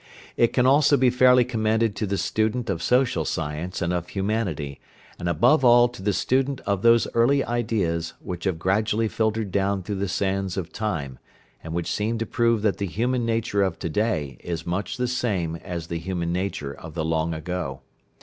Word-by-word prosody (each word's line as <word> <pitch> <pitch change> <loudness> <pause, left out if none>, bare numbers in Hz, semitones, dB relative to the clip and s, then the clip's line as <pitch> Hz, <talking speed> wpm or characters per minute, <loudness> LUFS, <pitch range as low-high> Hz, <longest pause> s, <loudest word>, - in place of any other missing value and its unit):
It 120 - +3
can 125 - +2
also 145 +2 +5
be 130 -2 +4
fairly 125 0 +5
commended 110 -2 0
to 105 - -1
the 100 +1 -1
student 110 +2 0
of 85 -3 -3
social 125 -5 +2
science 80 +5 -3
and 85 +1 0
of 90 -1 -2
humanity, 95 -9 -2 0.4
and 85 - -2
above 115 - +4
all 120 0 +7
to 120 - -11
the 105 +2 +1
student 135 +6 0
of 100 -2 -1
those 115 0 +5
early 135 +4 +3
ideas, 105 -9 -1
which 90 0 -6
have 95 -4 0
gradually 105 +5 +1
filtered 110 -2 -1
down 100 0 0
through 100 +2 -4
the 100 - 0
sands 95 0 -1
of 90 -3 -4
time, 85 - -3 0.4
and 80 - -6
which 85 -1 -1
seem 110 +3 -1
to 115 - -2
prove 115 -2 +1
that 105 -2 +1
the 100 - -1
human 120 +5 -1
nature 115 -3 0
of 95 -4 0
to 85 - -4
day 80 - -1
is 85 -2 -5
much 100 +9 -3
the 125 0 0
same 100 -10 -1
as 85 -2 -6
the 85 0 -4
human 85 -1 -2
nature 90 -6 -3
of 80 +1 -11
the 80 -2 -1
long 80 0 0
ago. 80 -3 -4
100 Hz, 195 wpm, -24 LUFS, 85-115 Hz, 0.4 s, all